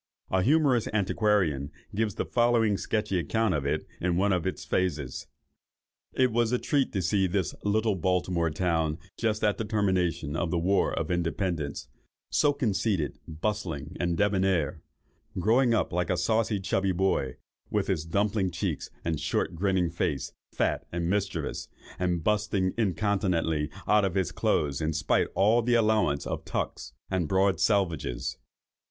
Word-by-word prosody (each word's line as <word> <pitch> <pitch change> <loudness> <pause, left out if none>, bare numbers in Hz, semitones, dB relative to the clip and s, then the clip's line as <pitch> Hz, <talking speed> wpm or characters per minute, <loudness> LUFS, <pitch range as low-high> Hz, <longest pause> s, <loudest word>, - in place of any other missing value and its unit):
A 95 - +3
humorous 135 - +3
antiquarian 95 -8 +1 0.2
gives 105 -1 -1
the - - -2
following 120 -3 +3
sketchy 105 -2 -1
account 110 +6 +1
of 70 -3 -1
it 75 +2 -1
in 90 -1 0
one 100 +1 +3
of 90 -1 0
its 95 - -4
phases. 75 -8 -2 0.9
"It 130 -2 +3
was 115 0 +1
a 125 - +3
treat 140 +1 0
to 95 -3 -1
see 95 +2 +2
this 90 -1 -1
little 110 +1 +2
Baltimore 90 -2 0
town 80 -1 0 0.2
just 110 -2 -1
at 105 -2 +2
the - - 0
termination 95 -8 0
of 85 +1 -1
the 85 - 0
war 95 +4 +2
of - - -2
Independence—so 85 - -2
conceited, 105 - -1
bustling, 80 -3 -3
and 85 -1 0
débonair—growing 100 - 0
up 110 - 0
like 90 0 0
a 90 - +1
saucy 110 +3 +1
chubby 95 0 0
boy, 90 -8 0 0.3
with - - 0
his 80 - -1
dumpling 100 +3 0
cheeks 85 -1 -3 0.2
and 80 -3 -1
short 75 - -1
grinning 90 -1 +1
face, 85 -5 -2 0.2
fat - - 0
and 85 0 -1
mischievous, 95 -7 -2 0.3
and 90 -2 0
bursting, 105 -2 +1
incontinently, 95 -7 0 0.2
out 105 -1 +4
of 95 -2 0
his 95 -5 0
clothes 70 0 0
in 80 +1 0
spite 80 - +1
of - - -22
all 110 +4 +4
the 120 +1 +2
allowance 105 -10 +2
of - - -4
tucks - - -4 0.2
and 90 -4 0
broad 95 +2 +2
selvages. 85 - 0
95 Hz, 150 wpm, -28 LUFS, 85-105 Hz, 0.9 s, out